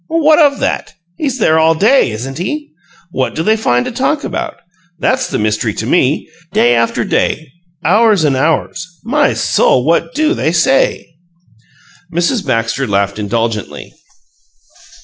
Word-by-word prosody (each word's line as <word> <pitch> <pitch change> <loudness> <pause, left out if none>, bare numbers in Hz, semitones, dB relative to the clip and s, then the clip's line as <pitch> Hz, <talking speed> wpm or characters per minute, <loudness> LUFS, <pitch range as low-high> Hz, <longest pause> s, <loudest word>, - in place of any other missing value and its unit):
"What 315 -1 +3
of 285 -3 +4
that? - - -3 0.2
He's 270 -4 -2
there 160 -8 +3
all 160 0 +3
day, 220 - +3
isn't 130 +6 -6
he? 295 - -4 0.4
What - - -2
do 160 - -1
they 220 +4 +3
find 125 - 0
to - - -4
talk 275 +5 -1
about? 335 -2 -4 0.4
That's 260 +8 0
the - - -2
mystery 110 0 -1
to 110 - -4
me! 140 +2 +1 0.3
Day 120 0 +4
after 115 -1 0
day; 160 -2 -1 0.4
hours 210 +1 +4
and 145 -3 +2
hours 160 +4 -1 0.2
My 285 +4 +1
soul! 125 0 +2
What 170 +10 0
do 310 +2 +2
they 160 - -1
SAY?" 165 -5 +2 1.1
Mrs. 175 +7 0
Baxter 115 +2 -1
laughed 100 0 -1
indulgently. 110 0 -3
165 Hz, 150 wpm, -14 LUFS, -, 1.1 s, of